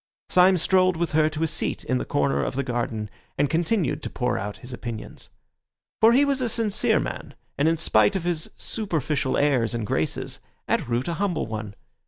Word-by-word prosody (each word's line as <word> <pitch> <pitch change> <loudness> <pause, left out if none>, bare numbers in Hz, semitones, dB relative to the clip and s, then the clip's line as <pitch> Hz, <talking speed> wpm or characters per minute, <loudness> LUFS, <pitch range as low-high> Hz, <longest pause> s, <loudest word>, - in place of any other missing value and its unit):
Syme 185 +1 +5
strolled 185 +1 +3
with 170 0 -1
her 155 0 +3
to 155 +1 -3
a - - +2
seat - - -2
in 65 - 0
the - - -3
corner 70 -1 +1
of - - -3
the 140 - 0
garden, 120 -4 -2 0.3
and 145 0 +1
continued 165 - 0
to - - -5
pour 125 -1 -1
out 100 +1 -4
his 125 - -8
opinions. 120 -3 -7 0.7
For 225 +1 +7
he 270 +4 +5
was 275 -2 0
a 245 - +1
sincere 220 -2 +2
man, - - -5 0.2
and 145 - +2
in 165 0 +2
spite 110 - +3
of 190 - -1
his 170 -2 -1
superficial 155 - -1
airs 125 -6 +2
and 115 -2 -2
graces, 80 -5 -2 0.3
at - - 0
root 120 +4 0
a 170 - -1
humble 190 -5 0
one. 110 -2 -6
150 Hz, 200 wpm, -25 LUFS, 115-180 Hz, 0.7 s, For